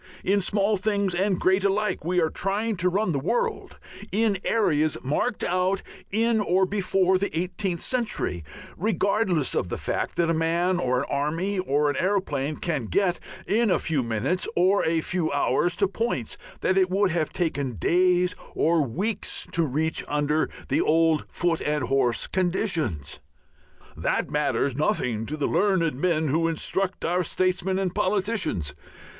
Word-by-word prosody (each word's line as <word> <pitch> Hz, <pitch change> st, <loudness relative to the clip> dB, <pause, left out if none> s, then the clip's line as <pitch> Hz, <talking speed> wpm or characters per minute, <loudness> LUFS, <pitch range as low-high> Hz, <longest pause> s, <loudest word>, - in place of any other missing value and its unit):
In 200 Hz, +1 st, +2 dB
small 205 Hz, +2 st, +1 dB
things 200 Hz, -1 st, 0 dB
and 190 Hz, +1 st, +1 dB
great 190 Hz, +1 st, +2 dB
alike 200 Hz, -2 st, 0 dB
we 180 Hz, +2 st, +1 dB
are 160 Hz, -2 st, +1 dB
trying 205 Hz, +4 st, -1 dB
to 180 Hz, +1 st, +2 dB
run 195 Hz, +1 st, 0 dB
the 140 Hz, -, 0 dB
world 470 Hz, -, -2 dB, 0.3 s
in 210 Hz, -2 st, +1 dB
areas 155 Hz, -9 st, +1 dB
marked 150 Hz, -, -1 dB
out 185 Hz, +2 st, 0 dB, 0.3 s
in 225 Hz, +2 st, +2 dB
or 190 Hz, -1 st, +2 dB
before 190 Hz, -1 st, +1 dB
the 200 Hz, -, -1 dB
eighteenth 180 Hz, -1 st, -2 dB
century, 225 Hz, -, -1 dB, 0.4 s
regardless 200 Hz, -4 st, +1 dB
of 90 Hz, -, -1 dB
the -, -, -3 dB
fact -, -, -3 dB
that 170 Hz, -, +2 dB
a 165 Hz, -, +2 dB
man 170 Hz, +3 st, +1 dB
or 125 Hz, 0 st, +1 dB
an -, -, -3 dB
army 165 Hz, +8 st, -1 dB
or 150 Hz, -4 st, +1 dB
an 145 Hz, -2 st, 0 dB
aeroplane 155 Hz, -7 st, 0 dB
can 150 Hz, -9 st, -2 dB
get 185 Hz, -, +1 dB, 0.3 s
in 225 Hz, +1 st, +2 dB
a -, -, +3 dB
few 155 Hz, -4 st, 0 dB
minutes 115 Hz, -, -1 dB
or 185 Hz, +3 st, +3 dB
a 160 Hz, 0 st, +1 dB
few 175 Hz, -3 st, -1 dB
hours 145 Hz, +5 st, +1 dB
to 200 Hz, +2 st, +2 dB
points 195 Hz, -, -2 dB, 0.3 s
that 190 Hz, +1 st, +2 dB
it 185 Hz, -1 st, +2 dB
would 195 Hz, 0 st, +2 dB
have 165 Hz, -3 st, -1 dB
taken 140 Hz, -8 st, -2 dB
days 180 Hz, -, +2 dB, 0.2 s
or 165 Hz, 0 st, +3 dB
weeks 190 Hz, -, -2 dB
to 170 Hz, -, +1 dB
reach 160 Hz, +2 st, -1 dB
under 150 Hz, +1 st, 0 dB, 0.2 s
the -, -, +2 dB
old 160 Hz, -1 st, +2 dB
foot 175 Hz, -2 st, 0 dB
and 150 Hz, -2 st, -1 dB
horse 125 Hz, -3 st, +1 dB
conditions. 170 Hz, -, -1 dB, 0.8 s
That -, -, -1 dB
matters 140 Hz, -2 st, 0 dB
nothing 120 Hz, -6 st, 0 dB
to 155 Hz, -, -4 dB
the 145 Hz, -, -1 dB
learned 175 Hz, -2 st, +2 dB
men 155 Hz, +2 st, 0 dB
who 165 Hz, +4 st, +2 dB
instruct 185 Hz, +3 st, -1 dB
our 180 Hz, +2 st, +1 dB
statesmen 185 Hz, +2 st, 0 dB
and 190 Hz, -2 st, -1 dB
politicians. 190 Hz, -, -1 dB
180 Hz, 160 wpm, -25 LUFS, 150-195 Hz, 0.8 s, a